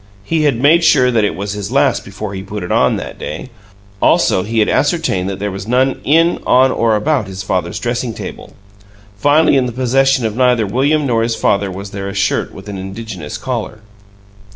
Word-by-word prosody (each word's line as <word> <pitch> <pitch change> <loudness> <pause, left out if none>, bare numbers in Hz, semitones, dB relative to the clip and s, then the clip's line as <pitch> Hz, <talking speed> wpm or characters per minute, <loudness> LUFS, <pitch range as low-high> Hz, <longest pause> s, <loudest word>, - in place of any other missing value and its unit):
He 155 +5 0
had 135 -6 +1
made 160 +6 +4
sure 130 -6 +4
that 115 -3 +2
it 100 - 0
was 100 +2 -4
his 105 0 -5
last 135 - +2
before 100 +1 -7
he 95 - -5
put 100 0 -6
it 90 - -5
on, - - +3
that - - -7
day; 130 - -6 0.5
also 95 - +3
he 110 +4 -4
had 110 - +3
ascertained 145 - 0
that 95 - -4
there 100 +1 -3
was 95 +1 -7
none 130 +3 +1
in, 165 +4 +3
on, 130 +1 +4
or 115 -3 +1
about 125 0 0
his 95 0 -6
father's 90 -2 -2
dressing 120 -1 -3
table. - - -9 0.6
Finally, 145 +6 +3
in 130 -1 +1
the - - -4
possession 130 +1 +1
of 110 -1 -2
neither 125 -3 +2
William 140 +8 +1
nor 115 -4 +1
his 115 0 0
father 100 0 +1
was 95 +1 -7
there 100 -1 -5
a 100 - -7
shirt 100 - 0
with 95 +2 -12
an 100 -2 -6
indigenous 95 -5 -7
collar. 115 -4 -5
115 Hz, 205 wpm, -16 LUFS, 100-130 Hz, 0.6 s, made